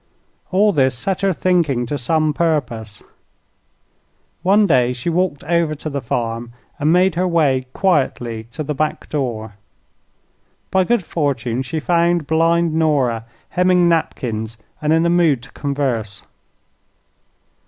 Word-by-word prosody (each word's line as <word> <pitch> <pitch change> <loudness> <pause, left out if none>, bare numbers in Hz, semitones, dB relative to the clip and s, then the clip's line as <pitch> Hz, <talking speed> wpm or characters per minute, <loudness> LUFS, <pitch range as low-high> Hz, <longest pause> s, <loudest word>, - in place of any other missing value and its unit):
All 205 +3 +3
this 130 -4 +2
set 190 +8 -2
her 195 0 +2
thinking 165 -9 +1
to 135 - -3
some 155 +4 +1
purpose. 120 -11 -2 1.4
One 200 +4 +4
day 125 -8 +3
she 125 +7 -3
walked 170 -5 0
over 165 0 +1
to 155 +1 -6
the 140 0 -3
farm 115 0 -3 0.3
and 150 +2 +2
made 180 +1 +4
her 180 +3 0
way 140 -7 +1
quietly 120 - 0
to 135 +6 -5
the 150 +1 -3
back 155 +2 -2
door. 110 -7 -3 1.1
By 190 -1 +3
good 235 -2 +1
fortune 130 -7 -1
she 135 +5 -3
found 170 0 +1
blind 165 +2 +2
Nora 140 -8 +1 0.2
hemming 180 -1 +3
napkins 115 -9 -1 0.2
and 150 0 0
in 165 +1 +3
a - - +3
mood 160 -8 +3
to 125 - -12
converse. 130 -8 -2
150 Hz, 135 wpm, -19 LUFS, 125-170 Hz, 1.4 s, One